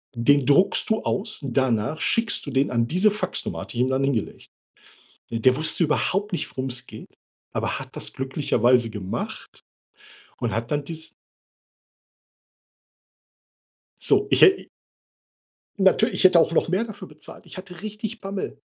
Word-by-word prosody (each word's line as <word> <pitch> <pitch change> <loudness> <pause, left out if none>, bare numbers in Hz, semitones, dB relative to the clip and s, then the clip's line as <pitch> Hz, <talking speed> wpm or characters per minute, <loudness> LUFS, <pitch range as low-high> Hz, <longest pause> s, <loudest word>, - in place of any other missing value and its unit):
den 135 +3 +3
druckst 145 +10 +3
du 220 - +1
aus, 215 +2 -1
danach 130 +1 0
schickst 230 -1 +1
du 140 - -4
den 135 +1 +1
an 115 -1 +1
diese 185 - +3
Faxnummer“, 210 +1 -3
hatte - - -8
die 120 - +2
ihm 130 - +1
dann 130 +1 0
hingelegt. 135 -6 -2 0.8
Der 115 +3 +3
wusste 155 +4 0
überhaupt 195 +6 0
nicht, 175 - -2
worum 130 0 -4
es 125 0 -2
geht, - - -11 0.4
aber - - -2
hat - - -10
das - - -2
glücklicherweise 125 -3 +1
gemacht 95 -3 -6 0.8
und 120 -2 -1
hat 115 +3 -3
dann 145 0 0
dies 160 +2 -6 2.9
So, - - +3
ich - - +3
hä 385 -1 +6 1.1
Natür 190 -1 +4
ich - - -1
hätte 180 -3 +7
auch 165 - +2
noch 165 - +2
mehr 190 +6 +1
dafür 215 -3 -9
bezahlt. - - -12
Ich - - -11
hatte 180 0 -10
richtig 215 +1 -6
Bammel. 195 0 -5
145 Hz, 150 wpm, -24 LUFS, 125-195 Hz, 2.9 s, hätte